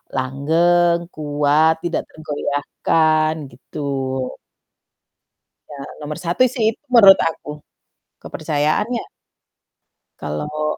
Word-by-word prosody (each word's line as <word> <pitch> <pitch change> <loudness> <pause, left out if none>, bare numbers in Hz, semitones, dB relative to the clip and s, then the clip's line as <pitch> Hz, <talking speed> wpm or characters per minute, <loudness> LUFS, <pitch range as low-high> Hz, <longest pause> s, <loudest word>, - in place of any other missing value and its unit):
langgeng, 170 +6 +2 0.2
kuat, 150 +1 +2
tidak 170 - -1
tergoyahkan, 155 +1 0 0.2
gitu. 130 0 -4 1.4
Ya 145 - -9 0.2
nomor 150 0 -5
satu 175 +8 +1
sih 235 -5 -2
itu, - - -29
menurut 200 -5 +8
aku, 150 -2 -4 0.6
kepercayaannya. 155 +10 -1 1.2
Kalau 150 - -3
155 Hz, 80 wpm, -20 LUFS, 145-170 Hz, 1.4 s, menurut